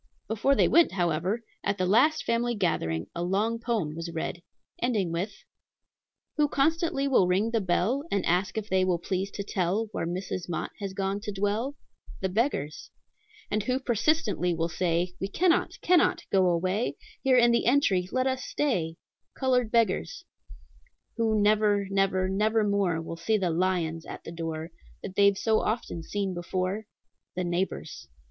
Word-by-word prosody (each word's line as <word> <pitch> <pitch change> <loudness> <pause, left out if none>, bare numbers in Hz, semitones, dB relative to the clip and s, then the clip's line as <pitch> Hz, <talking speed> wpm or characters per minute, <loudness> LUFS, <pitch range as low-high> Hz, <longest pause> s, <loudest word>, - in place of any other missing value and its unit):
Before 225 +6 +2
they - - +4
went, 340 - +4
however, 180 +5 0 0.2
at 200 - 0
the 185 - 0
last 250 +12 +4
family 235 +1 0
gathering 80 - 0
a 170 - -4
long 205 +6 0
poem 225 -10 -1
was 165 +1 -5
read, 165 +1 -4 0.4
ending 215 -8 0
with: 185 +5 -4 0.9
"Who 300 -1 +4
constantly 305 0 +1
will 250 -9 +4
ring 195 +5 +1
the 225 -2 +1
bell, 205 - 0
And 200 -2 0
ask 180 +5 +1
if 215 -1 -2
they 190 -1 +2
will 185 -2 +2
please 185 +3 -2
to 200 - -5
tell 195 +3 -1
Where 165 - -3
Mrs. 180 0 -4
Mott 170 - -3
has 200 -2 -4
gone 195 +1 -1
to 210 0 -5
dwell? 205 +7 -1 0.4
The 190 - -1
beggars. 185 - -1 0.6
"And 215 - +1
who 255 +5 0
persistently 225 - +1
will 165 +1 -1
say, 175 +1 0
'We 195 - -2
cannot, 345 - +1
cannot 360 -2 +3
go 190 -2 +4
away; 185 +6 0 0.2
Here 265 -2 +4
in 240 -1 +6
the 235 - +2
entry 195 -9 +3
let 255 0 +1
us 260 -1 -1
stay?' 180 - -1 0.4
Colored 250 -3 +1
beggars. 230 - +1 0.9
"Who 220 -2 +2
never, 205 -1 +3
never, 195 -1 +2
nevermore 200 -3 +1
Will 165 - -6
see 215 +6 +1
the 185 -4 0
'lions' 165 -2 -1
at - - -8
the - - -8
door 165 0 -5 0.3
That 190 -1 -6
they've 200 -1 +4
so 220 +1 +2
often 215 -6 -2
seen 195 +2 -3
before? 185 +4 -2 0.5
The 180 - -1
neighbors. 175 - -3
200 Hz, 165 wpm, -28 LUFS, 180-230 Hz, 0.9 s, in